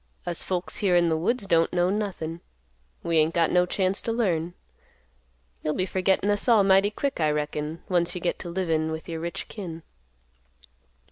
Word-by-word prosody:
Us 175 -1 0
folks 180 -1 -2
here 195 -4 +2
in 170 -1 +4
the 160 - +2
woods 200 +8 0
don't 165 -4 +3
know 175 +1 +2
nothin'. 180 -6 -3 0.6
We 170 -1 +1
ain't 155 +2 +2
got 165 -1 +3
no 180 0 +3
chance 190 +1 0
to 230 - -2
learn. 175 -7 0 1.1
You'll 155 - -1
be 185 - 0
forgettin' 190 +2 +1
us 205 +3 +1
all 220 -4 +6
mighty 195 +1 +4
quick, 275 +4 -3
I 155 -2 +2
reckon, 150 +1 -3
once 175 0 +1
you - - -3
get 175 - -2
to 175 - -6
livin' 165 -3 0
with 160 0 -6
your 165 -2 -4
rich 170 +1 -4
kin." 170 -6 -7
175 Hz, 185 wpm, -26 LUFS, 165-195 Hz, 1.1 s, all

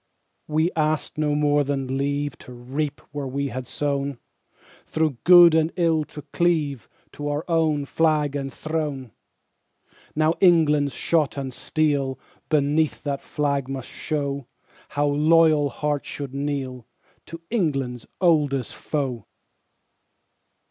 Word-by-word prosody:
We 155 +3 +1
asked 155 0 -1
no 150 -1 +1
more 145 0 +3
than 135 -2 -2
leave 145 +1 -1
To - - -12
reap 135 +4 -4
where 145 -1 -4
we 140 +2 -2
had 125 0 -6
sown, 140 -1 -2 0.7
Through 155 -5 0
good 175 -2 +9
and 160 0 +3
ill 165 -3 +2
to 150 0 -10
cleave 155 -7 0 0.2
To 145 - -6
our 145 +2 -2
own 160 -4 +1
flag 150 -1 +1
and 135 -1 -3
throne. 150 -6 -4 1.0
Now 155 +1 +3
England's 150 -6 +4
shot 155 -4 +1
and 135 -2 -4
steel 140 -2 0 0.3
Beneath 150 0 +1
that 140 -2 -2
flag 140 -3 -1
must 135 -2 -5
show 140 -4 -3 0.4
How 145 +1 0
loyal 155 0 +4
hearts 145 0 -2
should 140 -2 -6
kneel 135 -4 -3 0.4
To 165 - -8
England's 135 - -1
oldest 145 - +2
foe. 130 -8 -3
145 Hz, 125 wpm, -24 LUFS, 140-155 Hz, 1.0 s, good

